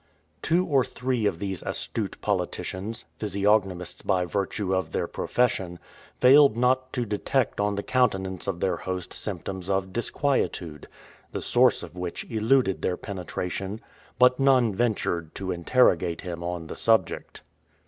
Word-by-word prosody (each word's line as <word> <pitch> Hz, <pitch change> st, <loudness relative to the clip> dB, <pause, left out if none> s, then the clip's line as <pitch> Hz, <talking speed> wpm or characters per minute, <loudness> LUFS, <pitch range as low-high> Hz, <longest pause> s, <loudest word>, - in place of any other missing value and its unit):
Two 175 Hz, +3 st, +2 dB
or 140 Hz, -6 st, +3 dB
three 125 Hz, -3 st, -1 dB
of 85 Hz, -, -1 dB
these 95 Hz, -1 st, -4 dB
astute -, -, -3 dB
politicians 100 Hz, +5 st, -3 dB
physiognomists 100 Hz, -4 st, 0 dB
by 90 Hz, -2 st, +1 dB
virtue 100 Hz, +1 st, -2 dB
of 95 Hz, 0 st, -1 dB
their -, -, 0 dB
profession 95 Hz, -8 st, -1 dB, 0.4 s
failed 135 Hz, -2 st, +7 dB
not 130 Hz, +1 st, +2 dB
to 125 Hz, -3 st, -1 dB
detect 115 Hz, +4 st, -1 dB
on 105 Hz, 0 st, +1 dB
the 100 Hz, -, -3 dB
countenance 95 Hz, -8 st, 0 dB
of 90 Hz, -3 st, -2 dB
their 95 Hz, -, +1 dB
host 90 Hz, -1 st, -5 dB
symptoms 95 Hz, -1 st, -5 dB
of 95 Hz, -1 st, -1 dB
disquietude, 105 Hz, -, -1 dB, 0.5 s
the -, -, -2 dB
source -, -, +3 dB
of -, -, -10 dB
which 90 Hz, -1 st, -4 dB
eluded 115 Hz, -1 st, +2 dB
their 90 Hz, -, 0 dB
penetration; 95 Hz, +2 st, -4 dB, 0.4 s
but 125 Hz, +1 st, +5 dB
none 130 Hz, -5 st, +4 dB
ventured 95 Hz, -7 st, -1 dB
to 95 Hz, -1 st, -3 dB
interrogate 90 Hz, -2 st, +2 dB
him 85 Hz, -1 st, -6 dB
on 85 Hz, -1 st, -4 dB
the -, -, -7 dB
subject. 110 Hz, -6 st, +1 dB
100 Hz, 140 wpm, -26 LUFS, 90-125 Hz, 0.5 s, failed